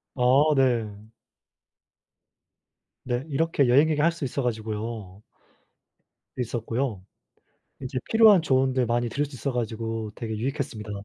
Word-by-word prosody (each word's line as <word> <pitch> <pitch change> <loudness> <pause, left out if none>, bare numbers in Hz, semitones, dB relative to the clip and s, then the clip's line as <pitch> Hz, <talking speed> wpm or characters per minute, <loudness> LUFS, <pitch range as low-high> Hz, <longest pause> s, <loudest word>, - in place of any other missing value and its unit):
아 130 - -5 0.3
네. 125 -5 +2 2.1
네. 125 0 -2
이렇게 145 -1 +1
여행 140 +6 +5
얘기할 155 +2 +2
수 165 -3 -5
있어 135 +1 -3
가지고요. 110 -3 -4 1.2
있었고요. 115 -2 -3 0.8
이제 130 0 -3
필요한 220 -5 +6
조언들 130 -3 +1
많이 120 +1 0
들을 145 +5 -1
수 140 -1 -11
있어 130 +3 -3
가지고 115 -2 -3
되게 110 -1 -5
유익했습니다. 120 -3 -4
125 Hz, 260 characters per minute, -25 LUFS, 115-140 Hz, 2.1 s, 필요한